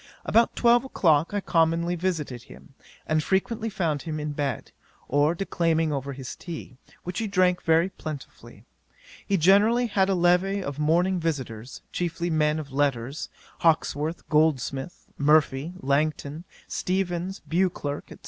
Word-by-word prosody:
About 230 +1 +3
twelve 240 0 +4
o'clock 165 - +2
I 205 0 -1
commonly 170 0 +1
visited 160 -9 -2
him, - - -15 0.3
and 155 0 +1
frequently 220 +6 -1
found 165 -8 -1
him 155 -2 -4
in 150 0 -3
bed, 140 -4 -3 0.4
or 145 +4 +2
declaiming 165 -4 0
over 140 0 -3
his 130 -1 -7
tea, 160 -7 -8 0.3
which 180 0 -4
he 225 - -1
drank 185 -2 +2
very 165 +3 +3
plentifully. 155 -6 -9 0.6
He 200 - +1
generally 205 +8 +4
had 195 -4 +1
a 195 - +2
levee 180 +3 +2
of 140 -2 -5
morning 175 +5 +2
visitors, 130 -7 -4
chiefly 170 0 -2
men 150 -1 +2
of 145 -3 -6
letters; 135 +1 -1 0.3
Hawkesworth, 160 -1 0
Goldsmith, 150 -1 0
Murphy, 150 +1 +3
Langton, 150 +3 -1 0.2
Steevens, 185 0 -2
Beauclerk, 165 -5 -1
&c. - - -10
165 Hz, 140 wpm, -26 LUFS, 145-185 Hz, 0.6 s, twelve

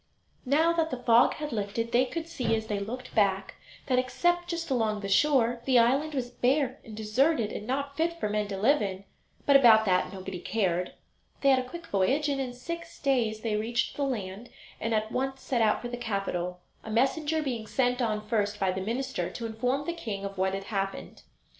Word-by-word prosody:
Now 320 +5 +4
that 325 -1 +1
the 255 - -3
fog 240 -1 +4
had 300 -1 -5
lifted 225 +2 -2
they 250 +2 +4
could 325 +5 -5
see 250 -9 0
as 220 0 -3
they 210 -2 -2
looked 245 +6 -6
back 195 -2 +1 0.3
that, 255 -2 +2
except 350 +7 +1
just 335 -3 -4
along 220 -4 +1
the 200 - -4
shore, 240 +1 +3
the 260 -2 +4
island 275 +6 +3
was 245 -2 -2
bare 260 +2 +1
and 215 -2 -10
deserted 225 +2 +1
and 210 - -6
not 280 +2 -2
fit 335 +2 -1
for - - 0
men 210 0 -1
to 200 -1 -4
live 260 +8 +3
in; 195 -1 -3 0.4
but 280 - +5
about 225 -5 +7
that 185 -2 +2
nobody 190 -1 -6
cared. 180 -3 -1 0.5
They 275 - +4
had 265 -1 +5
a 255 0 -5
quick 345 +2 -8
voyage, 270 +8 +1
and 275 -1 0
in 250 -2 -4
six 335 +6 -7
days 235 -6 +1
they 220 -2 -1
reached 230 +2 -1
the - - -4
land, 215 -4 -4 0.3
and 225 0 0
at 215 0 -1
once 265 +1 -2
set 245 -3 0
out 215 +1 +2
for - - -3
the 245 0 -5
capital, 190 -6 -3 0.2
a - - -8
messenger 295 +7 +1
being 235 -6 -3
sent 250 0 +1
on 215 -2 -1
first 210 -2 0
by 190 -1 +2
the 190 +1 -3
minister 255 +6 -2
to 235 - -6
inform 250 +5 -1
the 340 - -2
king 210 -12 -5
of 195 0 -5
what 190 0 0
had 195 - -5
happened. 195 -1 -3
240 Hz, 210 wpm, -28 LUFS, 210-275 Hz, 0.5 s, about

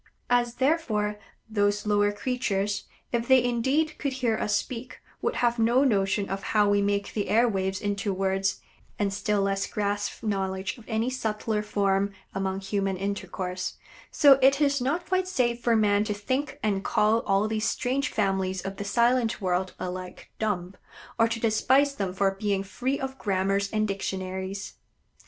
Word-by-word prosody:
As, 240 -1 +2
therefore, 245 -8 0 0.3
those 205 -1 +1
lower 205 0 +3
creatures, 205 -3 -1 0.3
if 235 -1 -1
they 260 -2 +6
indeed 265 +6 0
could 280 -2 -1
hear 245 -4 0
us 210 -1 0
speak, 255 0 -4 0.2
would - - -1
have 240 -1 +1
no 235 +4 +4
notion 200 -5 +1
of 195 0 -3 0.2
how 210 -1 +5
we 205 0 +3
make 200 0 -1
the 205 - -2
air 230 +3 +4
waves 190 -3 -1
into 205 0 -1
words, 195 0 0 0.4
and 200 -2 0
still 205 0 0
less 195 0 0
grasp 205 +1 -2
knowledge 190 0 -2
of 225 - -15
any 225 +2 0
subtler 220 -3 -1
form 200 -1 0 0.2
among 195 0 -2
human 195 -1 -1
intercourse, 190 -1 -3 0.3
so 280 -3 +6
it 275 +2 +5
is 280 -2 +2
not 295 +8 -1
quite 370 0 0
safe 245 -9 0
for 235 -1 +3
man 205 -1 +3
to 210 -1 -2
think 265 +7 -2
and 200 -2 0
call 215 +2 +3
all 195 +1 +3
these 215 0 -1
strange 265 +3 -1
families 190 -2 0
of 195 0 -5
the - - -4
silent 235 +3 +2
world 185 -1 -1
alike 185 0 -6
dumb, 195 -4 -1 0.5
or 225 - +5
to 230 0 -3
despise 260 +6 +3
them 195 -8 -2
for 195 +1 +1
being 195 0 -1
free 245 +8 -2
of 265 0 -5
grammars 195 0 0
and 215 -1 +1
dictionaries. 190 0 -4
210 Hz, 165 wpm, -27 LUFS, 195-240 Hz, 0.5 s, they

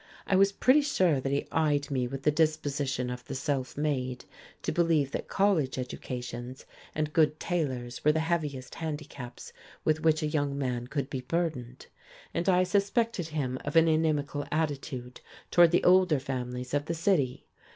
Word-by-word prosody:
I 195 - +1
was 195 +1 +5
pretty 255 +8 +4
sure 185 - +2
that 135 - -2
he 140 - -1
eyed 145 -3 +1
me 130 -2 0
with 135 +2 -6
the 150 - +4
disposition 145 -5 0
of 125 0 -6
the 135 - -6
self 135 -1 -2
made 130 -4 -2 0.4
to - - -1
believe 165 -5 +2
that - - -4
college 185 -11 +1
educations 125 0 -6 0.3
and 150 0 -1
good 155 -1 +3
tailors 130 -9 -2
were 150 - +5
the 160 - 0
heaviest 150 -6 -2
handicaps 150 -5 -7 0.3
with 155 0 +2
which 160 -1 +3
a - - +1
young 145 -2 -1
man 125 -3 -2
could 140 -1 -2
be 135 -2 -4
burdened: 130 -4 -3 0.5
and 170 +3 0
I 180 0 +5
suspected 200 0 0
him 135 -5 -2
of - - -4
an 165 0 +6
inimical 155 -2 +1
attitude 140 -5 -3 0.3
toward 175 -1 +7
the 175 - +2
older 180 -5 +5
families 125 -1 -4
of 145 0 +1
the 170 - -2
city. 160 -7 +1
150 Hz, 170 wpm, -29 LUFS, 130-165 Hz, 0.5 s, toward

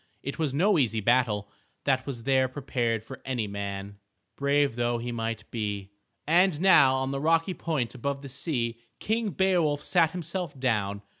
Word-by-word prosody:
It 140 +4 -5
was 155 -4 0
no 175 +6 +3
easy 115 -4 +1
battle 110 -2 +2 0.4
that 130 -1 +1
was 120 -4 -5
there 130 0 +3
prepared 120 -4 -2
for 135 +4 -10
any 125 -5 -2
man, 100 0 -5 0.4
brave 140 -2 +2
though 120 0 0
he 120 +1 -4
might 115 -1 -3
be. 105 -3 -3 0.3
And 175 0 +3
now 150 -8 +6
on 130 0 -1
the 135 0 -3
rocky 165 +3 +2
point 155 -9 -2
above 140 +2 -3
the - - -6
sea 125 -5 -2 0.2
King 220 0 -1
Beowulf 175 -6 +1
sat 170 -3 +3
himself 170 -3 -4
down. 105 -5 0
130 Hz, 165 wpm, -27 LUFS, 115-155 Hz, 0.4 s, now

